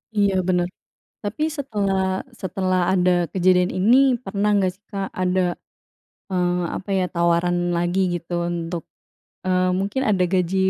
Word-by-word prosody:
Iya 200 -2 +3
bener, 180 -1 +2 0.6
tapi 210 +8 -4
setelah 205 -8 -1 0.4
setelah 185 -1 0
ada 180 -1 +3 0.2
kejadian 180 -1 +3
ini 205 +7 +4 0.3
pernah 200 +2 -1
nggak 195 -2 +2
sih 200 +2 -33
Kak, 195 -2 -3
ada, 185 0 +2 0.9
eee, 180 -1 +1 0.2
apa 195 - -7
ya 185 - +2
tawaran 170 0 +2 0.2
lagi 175 +2 0 0.2
gitu 170 0 -8 0.2
untuk, 170 0 -4 0.6
eee, 185 0 +2
mungkin 200 +7 -1
ada 195 -4 +2
gaji, 185 0 +1
185 Hz, 135 wpm, -22 LUFS, 180-195 Hz, 0.9 s, ini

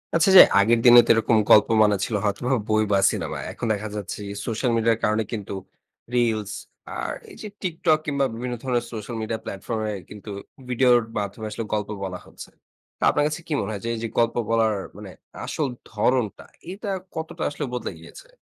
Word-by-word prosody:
আচ্ছা 165 +3 +4
যে, - - +14 0.2
আগের 115 +4 +4
দিনে 120 0 +10
তো - - -10
এরকম 115 0 +2
গল্প 105 - +7 0.2
মানে 105 -1 +3
ছিল 110 - -3
হয়তোবা 105 +5 -1 0.2
বই 110 0 +3
বা 100 - +4
সিনেমা। - - -4
এখন - - -5
দেখা 105 +1 -4
যাচ্ছে 105 -3 -5
কি, 100 - -5
সোশ্যাল 120 +2 0
মিডিয়ার 115 0 +2
কারণে 110 +1 +2
কিন্তু 105 -4 -5 0.6
রিলস 110 -4 +1 0.5
আর - - -3 0.2
এই - - -12
যে, 215 - -6
TikTok 160 -4 +1
কিংবা 140 -2 +1
বিভিন্ন 120 +2 -4
ধরনের 125 -3 0
সোশ্যাল 110 +2 -6
মিডিয়া 110 0 -3
প্ল্যাটফর্ম 110 +3 -4
এ - - -3 0.2
কিন্তু 105 +1 -10 0.4
ভিডিওর 125 0 +4 0.2
মাধ্যমে 105 +1 -4
আসলে 115 - -4
গল্প 105 -1 -1
বলা 90 -1 -4
হচ্ছে। - - -11 0.5
তো - - -4
আপনার 145 - +2
কাছে 155 +3 -4
কি 160 - -2
মনে - - -3
হয় 100 - -6
যে, - - -1
এই - - -5
যে - - -1
গল্প 115 -1 +2
বলার 115 -1 +3 0.2
মানে 105 -2 -9 0.3
আসল 150 -3 -1 0.2
ধরণটা, 110 0 0 0.3
এটা 205 +2 -6 0.3
কতটা 160 0 -5
আসলে 145 0 -4
বদলে 125 - -3
গিয়েছে? - - -13
115 Hz, 190 wpm, -24 LUFS, 105-125 Hz, 0.6 s, যে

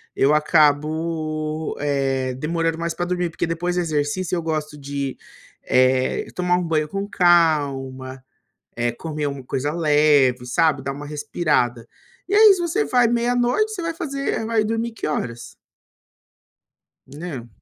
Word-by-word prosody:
eu 140 +2 +3
acabo, 155 +1 +1
eh, 135 -3 0
demorando 165 +3 -1
mais 170 -1 -2
para 175 - -2
dormir, 180 -1 -1
porque 165 - -2
depois 175 +2 -2
do 180 - +1
exercício 160 +3 -1
eu 170 - -1
gosto 155 -2 -3
de, 140 -1 -4 0.5
eh, 130 0 +2
tomar 180 0 +1
um 180 - -1
banho 155 -2 0
com 195 +5 -4
calma, 140 -8 +1 0.5
eh, 120 0 0
comer 150 +4 -4
uma 140 -2 -5
coisa 135 +3 -2
leve, 150 -5 +3
sabe? 155 +1 +2
Dar 135 +1 -3
uma 145 +1 -8
respirada. 145 -5 -1 0.4
E 385 - -3
aí 430 0 +8
se - - -6
você 345 +6 0
vai 245 -1 +3
meia-noite 245 - +1
você 380 - -5
vai 330 0 -2
fazer 280 -8 -3
vai 225 -1 +2
dormir 225 +2 -2
que - - -6
horas? 120 -6 -4 1.5
Né. 145 -5 -7
155 Hz, 145 wpm, -22 LUFS, 140-180 Hz, 1.5 s, aí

